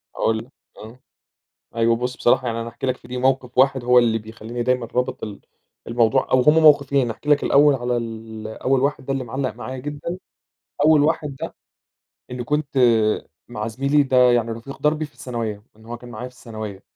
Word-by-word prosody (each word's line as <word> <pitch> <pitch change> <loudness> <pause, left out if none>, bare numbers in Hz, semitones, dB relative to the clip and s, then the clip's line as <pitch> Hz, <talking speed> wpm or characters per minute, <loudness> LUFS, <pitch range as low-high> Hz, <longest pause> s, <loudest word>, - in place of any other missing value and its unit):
هاقول 110 0 +1
لك، 120 +4 -9 0.3
آه، 115 +4 -12 0.8
أيوه 115 0 +3
بُصّ. 125 +1 -3
بصراحة 125 +1 +2
يعني 115 0 -2
أنا 115 - -5
هاحكي 120 +3 -5
لك 130 - 0
في - - -17
دي 125 +1 -5
موقف 130 -1 0
واحد 130 -1 +3
هو 125 0 +6
اللي 115 -2 +2
بيخلّيني 110 +2 -6
دايمًا 125 -1 +1
رابط 125 0 -1
ال 105 -2 -6 0.5
الموضوع، 120 +3 +1
أو 130 - +5
هُم 150 +4 +5
موقفين، 140 -3 +5
هاحكي 145 +6 -6
لك 145 -1 +4
الأول 145 0 +5
على 125 -1 -1
ال 110 -1 -6
أول 130 +4 0
واحد 140 -2 -1
ده 135 - -1
اللي 135 -1 -2
معلّق 130 +1 -3
معايا 125 +2 -6
جدًا، 145 +6 -5 0.7
أول 155 -2 +6
واحد 150 -3 0
ده - - -5 0.8
إني 125 -1 -5
كنت 150 0 -1 0.7
مع 105 +1 -4
زميلي 140 +5 +2
ده 130 -2 0 0.2
يعني 115 -1 +1
رفيق 135 +4 -9
دربي 150 +1 +1
في 150 - -12
الثانوية، 115 -4 -5
إن 110 - -18
هو 120 +1 -6
كان 120 +1 -12
معايا 120 +2 -6
في 125 - -21
الثانوية، 110 -5 -8
125 Hz, 195 wpm, -22 LUFS, 115-135 Hz, 0.8 s, هو